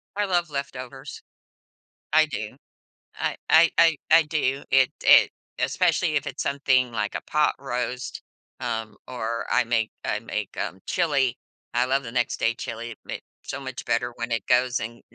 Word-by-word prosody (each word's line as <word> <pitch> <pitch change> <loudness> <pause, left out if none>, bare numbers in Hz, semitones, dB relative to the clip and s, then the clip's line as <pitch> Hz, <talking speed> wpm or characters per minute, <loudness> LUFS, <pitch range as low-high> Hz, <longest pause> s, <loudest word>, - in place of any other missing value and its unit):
I 205 0 +1
love 175 -3 +1
leftovers, 135 -1 -6 0.9
I - - +6
do. - - -5 0.6
I - - -2
I 165 +1 +7
I 165 -3 +5
I 165 - +9
do. 140 -3 -1
It 135 -1 +5
it - - +7 0.3
especially 155 -3 +2
if 150 -1 +1
it's 140 0 -4
something 130 -3 +2
like 105 -2 -2
a - - -2
pot 150 0 +2
roast, 125 -1 -4 0.4
um, 110 -4 -3
or 115 -2 -3
I - - +4
make 115 -2 0
I - - -1
make, - - -5
um, 95 - -3
chili, 140 -8 +1 0.4
I 120 +1 +3
love 135 +2 +1
the 115 - -7
next-day 120 -1 0
chili, 115 0 -6
it 110 - -10
makes - - -6 0.2
so 135 - -5
much 130 -2 -7
better 120 +1 0
when 120 0 -5
it 115 -3 -1
goes 125 0 +3
and 115 +2 -6
125 Hz, 165 wpm, -25 LUFS, 120-140 Hz, 0.9 s, I